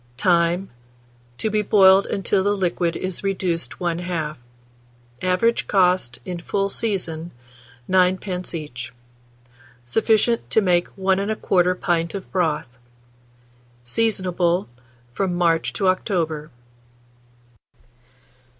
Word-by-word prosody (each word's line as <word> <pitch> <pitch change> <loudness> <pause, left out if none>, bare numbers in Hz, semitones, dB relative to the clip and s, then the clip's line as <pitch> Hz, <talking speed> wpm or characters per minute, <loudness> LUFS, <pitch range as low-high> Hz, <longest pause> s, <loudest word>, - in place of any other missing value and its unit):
Time. 175 +3 +2 0.7
To 220 - -1
be 215 0 +2
boiled 195 -1 +5
until 195 0 0
the 205 +1 +1
liquid 175 -2 0
is 185 0 -4
reduced 185 -3 -2
one 170 -1 -1
half. 160 -5 -3 0.8
Average 185 +6 +1
cost, 180 - +2
in 180 -2 -5
full 195 +3 -1
season, 175 -7 -3 0.6
9d. 185 -1 +1
each. 130 -6 -6 0.9
Sufficient 225 - +1
to - - +3
make 180 -4 +2
1 190 0 +2
1/4 185 -3 +1
pint 170 0 0
of 195 - -7
broth. 150 -8 -1 1.0
Seasonable 180 - 0 0.5
from 185 +4 -1
March 165 -2 +1
to 195 - 0
October. 165 -5 0
180 Hz, 100 wpm, -22 LUFS, 170-195 Hz, 1.0 s, boiled